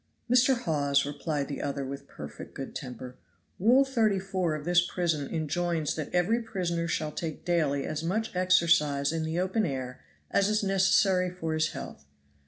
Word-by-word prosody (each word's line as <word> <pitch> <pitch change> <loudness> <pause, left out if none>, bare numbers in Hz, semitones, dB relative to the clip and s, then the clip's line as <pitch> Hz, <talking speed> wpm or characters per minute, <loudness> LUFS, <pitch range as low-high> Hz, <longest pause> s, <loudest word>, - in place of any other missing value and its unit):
"Mr. 250 +1 +4
Hawes," 140 - +1
replied 145 0 -3
the 145 - -5
other 140 -1 -3
with 140 +1 -7
perfect - - -10
good - - -6
temper, 125 0 -7 0.4
"Rule 245 +8 +5
34 195 - 0
of 150 -1 -7
this 175 0 +4
prison 165 -5 -1
enjoins 160 0 -1
that 155 -3 -4
every 200 +7 +2
prisoner 175 -6 -2
shall 155 -2 -1
take 160 -1 -5
daily 150 -5 +1
as 155 +1 -3
much 205 +5 -2
exercise 170 -6 +3
in 165 -1 -1
the 160 +2 -2
open 190 +4 0
air 130 -6 -4 0.3
as 200 +1 +3
is 215 0 +1
necessary 190 -1 +3
for 165 -3 -4
his 155 -1 0
health. 70 - -8
170 Hz, 165 wpm, -28 LUFS, 150-190 Hz, 0.4 s, Rule